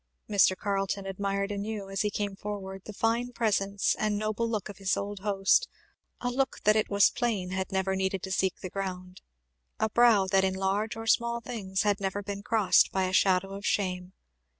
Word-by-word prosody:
Mr. 195 Hz, -2 st, +4 dB
Carleton 195 Hz, 0 st, -2 dB
admired 200 Hz, +1 st, -2 dB
anew, 205 Hz, 0 st, -4 dB
as 195 Hz, -, -1 dB
he 210 Hz, -, +1 dB
came 205 Hz, -1 st, -3 dB
forward, 195 Hz, -1 st, -6 dB
the -, -, -7 dB
fine 230 Hz, +4 st, 0 dB
presence 200 Hz, -4 st, +1 dB
and 210 Hz, -1 st, 0 dB
noble 215 Hz, +2 st, -1 dB
look 215 Hz, -3 st, -2 dB
of 205 Hz, -2 st, -10 dB
his 190 Hz, -1 st, 0 dB
old 200 Hz, 0 st, -4 dB
host; 200 Hz, -, +2 dB, 0.5 s
a 245 Hz, -, -1 dB
look 265 Hz, +2 st, -1 dB
that 210 Hz, +1 st, +5 dB
it 215 Hz, -, +1 dB
was 200 Hz, 0 st, +5 dB
plain 215 Hz, -7 st, -1 dB
had 190 Hz, 0 st, -3 dB
never 190 Hz, 0 st, 0 dB
needed 190 Hz, -1 st, -1 dB
to 190 Hz, -, -5 dB
seek 190 Hz, 0 st, 0 dB
the 185 Hz, -, -5 dB
ground; 185 Hz, -1 st, -5 dB, 0.6 s
a 220 Hz, -, 0 dB
brow 230 Hz, -4 st, +5 dB
that 190 Hz, 0 st, +2 dB
in 190 Hz, 0 st, +1 dB
large 195 Hz, +3 st, -1 dB
or 225 Hz, 0 st, -6 dB
small 235 Hz, +1 st, +2 dB
things 200 Hz, -5 st, -3 dB
had 205 Hz, -1 st, +1 dB
never 195 Hz, +1 st, -2 dB
been 200 Hz, 0 st, -5 dB
crossed 215 Hz, -1 st, +3 dB
by 190 Hz, -, 0 dB
a 185 Hz, 0 st, -1 dB
shadow 190 Hz, 0 st, +3 dB
of 200 Hz, +1 st, -7 dB
shame. 185 Hz, -3 st, -1 dB
200 Hz, 195 wpm, -28 LUFS, 190-215 Hz, 0.6 s, that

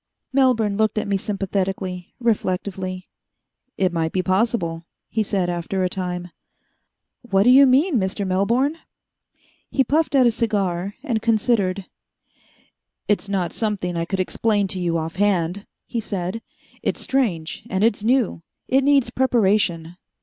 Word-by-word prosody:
Melbourne 235 Hz, -7 st, +3 dB
looked 220 Hz, 0 st, +1 dB
at 215 Hz, -, -1 dB
me 200 Hz, -, +1 dB
sympathetically, 190 Hz, -2 st, -3 dB
reflectively. 185 Hz, -4 st, -2 dB, 0.7 s
"It 185 Hz, -2 st, +1 dB
might 160 Hz, -1 st, 0 dB
be 185 Hz, -, 0 dB
possible," 185 Hz, -5 st, 0 dB, 0.2 s
he 220 Hz, -, 0 dB
said 195 Hz, -3 st, 0 dB
after 175 Hz, +2 st, -2 dB
a 180 Hz, -, +1 dB
time. 180 Hz, -1 st, -4 dB, 0.9 s
"What 195 Hz, -5 st, +2 dB
do 245 Hz, -, +6 dB
you 275 Hz, +2 st, +8 dB
mean, 275 Hz, +4 st, +3 dB
Mr. 195 Hz, +1 st, -2 dB
Melbourne?" 235 Hz, -, +1 dB, 0.9 s
He 270 Hz, -, +2 dB
puffed 300 Hz, +3 st, +1 dB
at 260 Hz, -2 st, +6 dB
a 240 Hz, -, +5 dB
cigar, 200 Hz, -5 st, -1 dB
and 225 Hz, -4 st, -1 dB
considered. 210 Hz, -4 st, +1 dB, 1.2 s
"It's 205 Hz, -1 st, 0 dB
not 185 Hz, -4 st, -1 dB
something 200 Hz, -5 st, -2 dB
I 165 Hz, 0 st, -1 dB
could 190 Hz, +2 st, -3 dB
explain 205 Hz, +2 st, +1 dB
to 185 Hz, -, -4 dB
you 170 Hz, -2 st, 0 dB
off 160 Hz, +2 st, -4 dB
hand," 195 Hz, -1 st, 0 dB, 0.2 s
he 235 Hz, -, -3 dB
said. 200 Hz, 0 st, -4 dB, 0.4 s
"It's -, -, -2 dB
strange 205 Hz, -9 st, -1 dB
and 190 Hz, +2 st, 0 dB
it's 215 Hz, -2 st, +2 dB
new. 240 Hz, -6 st, +1 dB, 0.3 s
It 265 Hz, +1 st, +3 dB
needs 280 Hz, -2 st, +3 dB
preparation." 195 Hz, -9 st, +1 dB
200 Hz, 140 wpm, -22 LUFS, 185-230 Hz, 1.2 s, you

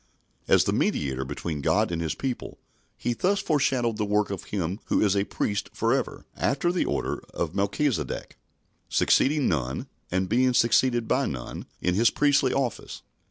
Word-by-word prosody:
As -, -, +5 dB
the -, -, 0 dB
mediator 65 Hz, -2 st, 0 dB
between 75 Hz, +1 st, -4 dB
God 105 Hz, +7 st, +2 dB
and 85 Hz, -1 st, -2 dB
His 80 Hz, -3 st, -2 dB
people, 130 Hz, -3 st, -4 dB, 0.4 s
he 120 Hz, -, -1 dB
thus 195 Hz, +10 st, +1 dB
foreshadowed 130 Hz, -, +1 dB
the 105 Hz, -, 0 dB
work 105 Hz, 0 st, +1 dB
of 95 Hz, -, -5 dB
Him 95 Hz, 0 st, -3 dB
who -, -, +1 dB
is 105 Hz, -2 st, +3 dB
a 100 Hz, 0 st, +1 dB
"priest 105 Hz, 0 st, -2 dB
for -, -, +1 dB
ever, -, -, -2 dB
after 145 Hz, +6 st, +1 dB
the 180 Hz, -, 0 dB
order -, -, -2 dB, 0.2 s
of 85 Hz, -1 st, -2 dB
Melchizedek," 105 Hz, +7 st, -1 dB, 0.5 s
succeeding 145 Hz, 0 st, +3 dB
none, 65 Hz, -5 st, -1 dB, 0.2 s
and 95 Hz, +1 st, 0 dB
being 125 Hz, +4 st, +2 dB
succeeded 120 Hz, 0 st, +3 dB
by 135 Hz, +1 st, +1 dB
none, 65 Hz, -3 st, -6 dB
in 90 Hz, -, +1 dB
His 115 Hz, +5 st, +4 dB
priestly 140 Hz, -3 st, +3 dB
office. 135 Hz, -4 st, -3 dB
110 Hz, 165 wpm, -26 LUFS, 90-130 Hz, 0.5 s, As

